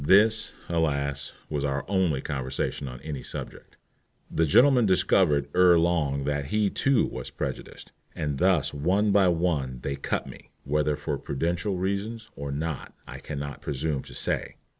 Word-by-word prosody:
This, 110 +7 +4
alas! 70 -4 -1 0.2
was 75 -2 -2
our 70 0 -1
only 90 -8 +1
conversation 65 0 -3
on 60 -1 -7
any 75 -3 -5
subject. - - -8 0.5
The 80 0 +2
gentleman 125 - +5
discovered 85 -6 +3
ere 90 -1 +6
long 80 -5 +1
that 70 0 -1
he 105 +6 +1
too 135 -3 +2
was - - -5
prejudiced, - - -6 0.2
and 75 -3 -2
thus 90 -6 +2
one 95 +8 +2
by 100 -2 +5
one 80 -7 0
they 70 - -2
"cut" 70 - -2
me, - - -12
whether 75 +1 +1
for 75 -1 -3
prudential 85 +7 -1
reasons 100 +4 -3
or 70 0 -5
not 75 +1 -4
I - - -9
can 75 - -6
not 70 0 -5
presume 70 0 -2
to - - -11
say. - - -2
80 Hz, 160 wpm, -27 LUFS, 70-95 Hz, 0.5 s, ere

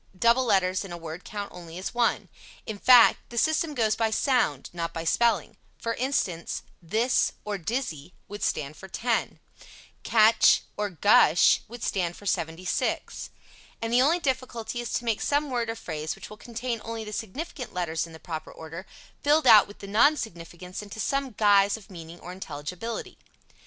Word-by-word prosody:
Double 235 +5 +4
letters 190 -5 +2
in 195 - -9
a 175 - -5
word 165 +1 -8
count 205 -1 -6
only 170 -1 -10
as 185 - -5
one. 240 -1 +1 0.4
In 215 -2 -6
fact, 245 0 +7
the 240 - -8
system 315 +3 +1
goes 220 -4 +2
by 225 -1 +1
sound, 220 - +1
not 170 -1 -4
by 165 - -3
spelling, 215 +2 +1 0.2
For 230 - -2
instance, 230 -10 -2 0.2
"this" 220 +9 +1
or 205 -2 -3
"dizzy" 180 - -4
would 205 0 -8
stand 150 -4 -1
for 190 - -11
ten; 230 +5 -1 0.6
"catch" 220 0 +5
or 210 0 -2
"gush" 175 -3 +5
would 240 +1 -9
stand 175 -3 -1
for 205 - -14
76, 165 -1 -2 0.5
and 225 +1 -3
the 245 - +5
only 310 +6 +4
difficulty 255 -6 -3
is 240 - -5
to 240 - -1
make 225 -3 0
some 290 0 0
word 235 -2 -1
or 225 - -2
phrase 155 -6 -5
which - - -11
will - - -8
contain 235 0 -4
only 225 -1 -5
the 210 0 -8
significant 250 - -5
letters 170 -2 -2
in 165 - -14
the 160 - -11
proper 160 -2 -6
order, 165 +4 -9 0.3
filled 300 +1 +3
out 220 -4 +8
with 205 - -14
non 220 +10 +4
significants 180 - -7
into 210 +1 -10
some 275 +5 -1
guise 205 -2 +4
of 205 -2 -16
meaning 170 -1 -10
or 180 - -8
intelligibility. 180 +5 -6
210 Hz, 175 wpm, -27 LUFS, 175-235 Hz, 0.6 s, out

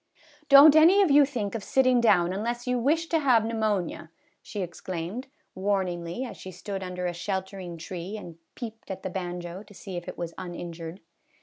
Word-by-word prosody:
" 300 -1 -28
Don't 285 +2 +9
any 350 +6 +7
of 350 - +2
you 285 0 +7
think 235 -8 -3
of 225 -3 -4
sitting 255 -2 +3
down 185 -6 +4
unless 235 +4 -3
you 250 -1 0
wish 310 +7 +2
to 325 - +2
have 250 -7 +4
pneumonia," 215 -8 -1 0.3
she 205 -3 -5
exclaimed, 180 +7 -5 0.3
warn 195 0 0
ingly, 175 +8 -4
as - - -9
she 190 - -9
stood 195 +2 -6
under 180 -1 -4
a 175 - -1
sheltering 190 -1 -4
tree 180 +5 -6
and 170 -5 -10 0.2
peeped 225 -2 -8
at 190 - -6
the 185 - -4
banjo 175 0 -5
to 205 - -16
see 190 -2 -7
if 175 - -7
it - - -7
was 170 -1 -4
injured. 175 -1 -7
195 Hz, 195 wpm, -27 LUFS, 175-245 Hz, 0.3 s, Don't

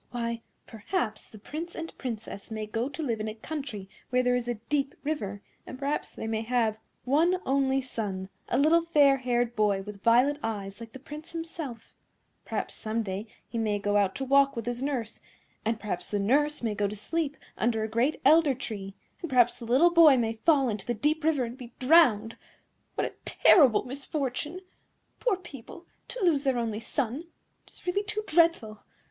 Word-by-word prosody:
Why, 235 -1 -3 0.2
perhaps 220 - -3
the 215 - -12
Prince 315 +11 -7
and 330 0 -6
Princess 225 -5 -6
may 215 -1 -4
go 225 +4 -2
to 315 +2 -5
live 230 -6 -1
in 215 - -3
a 215 - -5
country 250 -6 -6 0.2
where 250 0 +2
there 250 0 +3
is 245 -1 -2
a 240 - -1
deep 270 +5 -2
river, 205 -10 -3 0.2
and 255 - -7
perhaps 280 +2 -2
they - - -7
may 220 0 -1
have 225 -2 0 0.3
one 325 +8 +3
only 270 0 +2
son, 200 -7 -4 0.2
a 245 - +1
little 315 +4 +5
fair 290 -5 +4
haired 245 -2 0
boy 205 -2 +2
with 205 -1 -9
violet 250 +6 +4
eyes 200 -2 -4
like 230 -1 -10
the - - -7
Prince 300 +5 -9
himself; 325 -8 -6 0.5
and - - -45
perhaps - - -3
some 225 +1 -2
day 195 +2 -4 0.2
he 235 - -4
may 215 -2 +1
go 205 0 -1
out 200 -2 +2
to 270 - -3
walk 275 +1 +4
with 230 -2 -4
his 245 +1 -3
nurse; 255 -6 -3 0.4
and 225 0 -1
perhaps 180 -5 -4
the 205 - 0
nurse 290 +8 +2
may 225 -2 0
go 205 0 0
to 205 - -5
sleep 300 +7 -2 0.2
under 225 -1 0
a - - -1
great 235 +8 0
elder 310 -4 +6
tree; 200 -6 -6 0.3
and 340 - -4
perhaps 245 -2 +4
the 235 - -7
little 270 +9 +5
boy 325 -5 +7
may 225 -2 0
fall 275 +4 +3
into 210 -2 -4
the 240 - 0
deep 300 +8 0
river 305 -4 +2
and 240 +3 -6
be 240 -2 -10
drowned. 250 -7 +4 0.6
What - - 0
a - - -5
terrible 270 - +5
misfortune! 280 +4 -3 0.6
Poor 460 -7 +1
people, 345 -1 -11 0.2
to - - -5
lose 300 -5 +3
their 265 -3 +1
only 225 -3 -2
son! 260 +6 -2 0.4
It - - -20
is - - -15
really 365 +3 +1
too 425 +1 -3
dreadful! 325 - +2
245 Hz, 195 wpm, -28 LUFS, 220-295 Hz, 0.6 s, boy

